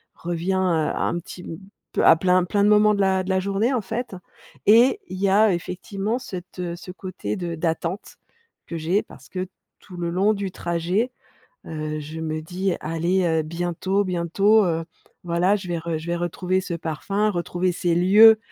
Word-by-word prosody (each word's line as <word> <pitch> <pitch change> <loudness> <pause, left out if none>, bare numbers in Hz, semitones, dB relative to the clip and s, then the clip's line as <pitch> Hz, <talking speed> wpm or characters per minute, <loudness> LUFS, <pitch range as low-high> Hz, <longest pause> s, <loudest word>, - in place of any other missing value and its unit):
revient 175 +2 -2
heu, - - +1 0.4
un 175 - -1
petit 180 +1 -10
m 165 - -7 0.4
peu - - +2
à - - +8
plein 180 +1 +3
plein 200 +3 +1
de - - +5
moments 210 0 +5
de - - -4
la 190 -1 +2
de 185 - -7
la 190 0 +2
journée, 200 +6 0
en 245 - +1
fait. 220 +4 -4 0.5
Et, 235 - +6
il 185 - -7
y 200 - +3
a 205 +1 +5
effectivement 195 +6 -3
cette, 185 -7 -8
heu, 175 -1 -3
ce 175 +1 -9
côté 185 +1 -5
de 175 -2 -4
d'attente, 165 +3 -3 0.5
que 170 - -6
j'ai, 170 +6 +1
parce - - -16
que, 185 0 -4 0.3
tout 180 - -13
le 170 -1 -2
long 190 +5 +2
du 200 -2 -4
trajet, 175 +8 -1 0.6
heu, 155 -1 -4
je 155 +2 -7
me 155 -1 -3
dis: 180 +3 -2
«Allez, 170 +4 0
heu, 160 -2 +2
bientôt, 175 +5 -1
bientôt, 195 +4 +3
heu, 165 -1 -1 0.4
voilà 175 +4 +2
je 190 -2 -8
vais 170 -1 -1
re 165 0 -3
je 160 - -9
vais 175 - 0
retrouver 180 +2 -1
ce 180 - -4
parfum, 180 +6 -1
retrouver 180 0 -1
ces 175 -1 0
lieux 210 +5 +7
180 Hz, 190 wpm, -23 LUFS, 170-200 Hz, 0.6 s, à